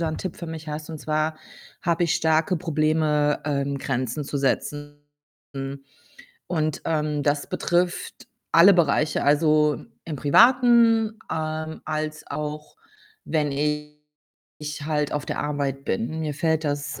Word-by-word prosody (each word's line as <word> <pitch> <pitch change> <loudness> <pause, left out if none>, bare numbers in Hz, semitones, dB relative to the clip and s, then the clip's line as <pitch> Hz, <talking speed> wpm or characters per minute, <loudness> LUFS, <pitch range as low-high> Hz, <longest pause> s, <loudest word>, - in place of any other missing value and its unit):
da 165 - 0
'n 155 - -4
Tipp 185 -3 -5
für 170 - -7
mich 160 -1 -7
hast. 150 +1 -5
Und 160 - -6
zwar 155 +1 -1 0.5
habe 170 0 +1
ich 170 - +1
starke 160 +2 +2
Probleme, 155 -2 +1
ähm, 140 -1 -1
Grenzen 130 +1 -2
zu 140 - -4
setzen. 145 +1 -2 1.4
Und, 155 -3 -1
ähm, 150 -2 0
das 145 0 0
betrifft 175 0 -1 0.3
alle 185 +4 +8
Bereiche. 155 -2 +2
Also, 150 0 +3 0.2
im 160 -3 -5
Privaten, 230 - +5
ähm, 155 0 -3
als 155 0 -3
auch 150 +1 -5 0.5
wenn 150 -3 0
ich 150 0 -6
halt 150 -2 0
auf 150 - -3
der - - -3
Arbeit 140 -2 -2
bin. 130 +10 -2
Mir 150 -2 -2
fällt 160 +1 0
das, 145 -1 -3
150 Hz, 135 wpm, -24 LUFS, 145-160 Hz, 1.4 s, alle